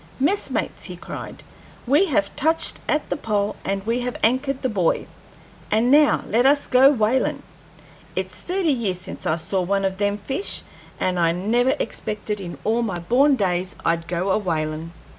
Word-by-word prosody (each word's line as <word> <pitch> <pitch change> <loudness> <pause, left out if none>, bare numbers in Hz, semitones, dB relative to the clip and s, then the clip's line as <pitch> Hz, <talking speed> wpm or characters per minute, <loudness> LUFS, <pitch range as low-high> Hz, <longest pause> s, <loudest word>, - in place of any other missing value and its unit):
"Messmates!" 345 +10 -1
he - - -6
cried, - - -8 0.4
"we 290 +10 +4
have 200 - 0
touched 320 +3 +1
at 300 - +1
the - - +2
pole, 210 -5 -1
and 195 0 -2
we 230 +2 0
have 250 0 -3
anchored 260 +4 +1
the - - +2
buoy, 190 -8 0 0.6
and 225 +4 +2
now 295 +1 +5
let 230 +3 +2
us 285 +1 +4
go 260 +2 +6
whalin'. 245 0 +1 0.7
It's - - -3
thirty 360 -4 0
years 210 -8 -1
since 185 - -6
I 155 - +2
saw 185 +3 -1
one 195 +2 0
of 190 0 -2
them 205 0 +1
fish, 270 - -3 0.4
and 180 -1 0
I 165 -1 +3
never 235 +8 +1
expected 210 -1 -3
in 175 -2 -7
all 225 +3 +1
my 200 -6 -2
born 255 +11 +3
days 185 -4 -1
I'd 165 0 0
go 180 +2 -1
a 200 - +2
whalin'." 160 -3 -2
215 Hz, 175 wpm, -22 LUFS, 185-260 Hz, 0.7 s, go